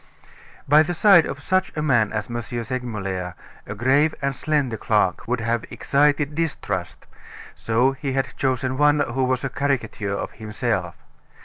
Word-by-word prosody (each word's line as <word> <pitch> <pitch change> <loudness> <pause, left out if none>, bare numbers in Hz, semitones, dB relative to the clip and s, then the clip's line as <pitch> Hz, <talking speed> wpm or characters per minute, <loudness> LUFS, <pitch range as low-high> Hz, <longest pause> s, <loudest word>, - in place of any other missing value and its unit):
By 150 +2 +7
the 175 +3 -1
side 185 -2 +6
of 140 - -5
such 185 +5 0
a - - 0
man 120 -8 +2
as 105 -1 -3
M. 120 - -4
Segmuller 110 -7 -4 0.3
a 105 - -5
grave 140 +8 +2
and 140 -1 -1
slender 145 -5 0
clerk 105 -5 0
would 125 0 -1
have 115 0 -1
excited 145 +1 +1
distrust; 140 - -3 0.5
so 120 +4 +1
he 135 0 -4
had 135 -1 -2
chosen 130 0 -1
one 150 0 +4
who 130 0 -1
was 130 0 0
a 135 - -1
caricature 115 -7 -2
of - - -4
himself. 105 -5 -3
130 Hz, 155 wpm, -23 LUFS, 110-145 Hz, 0.5 s, By